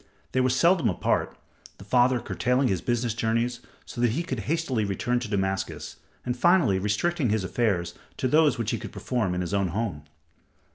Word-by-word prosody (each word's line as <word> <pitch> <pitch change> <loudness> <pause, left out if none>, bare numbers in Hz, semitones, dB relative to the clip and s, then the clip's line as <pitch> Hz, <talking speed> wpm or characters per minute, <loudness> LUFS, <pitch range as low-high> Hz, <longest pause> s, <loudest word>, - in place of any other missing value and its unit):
They 130 - +2
were 130 - +2
seldom 165 - +3
apart, 90 - -1 0.4
the - - -12
father 125 +3 +3
curtailing 125 +3 0
his 95 -4 0
business 120 -1 0
journeys 115 +2 0 0.3
so 120 - -6
that 120 -2 +3
he 165 +7 -1
could 130 -8 -4
hastily 150 -9 0
return 115 +5 -1
to 120 - -5
Damascus, 95 -2 -2 0.3
and 125 - -1
finally 145 - +3
restricting 125 - 0
his 105 -1 +1
affairs 95 -5 0 0.2
to 130 - 0
those 150 0 +4
which 115 -3 -1
he - - -2
could - - -8
perform 105 -8 -2
in 90 - -1
his 90 +2 -4
own 100 -1 +2
home. 90 -6 -3
120 Hz, 185 wpm, -26 LUFS, 100-130 Hz, 0.4 s, those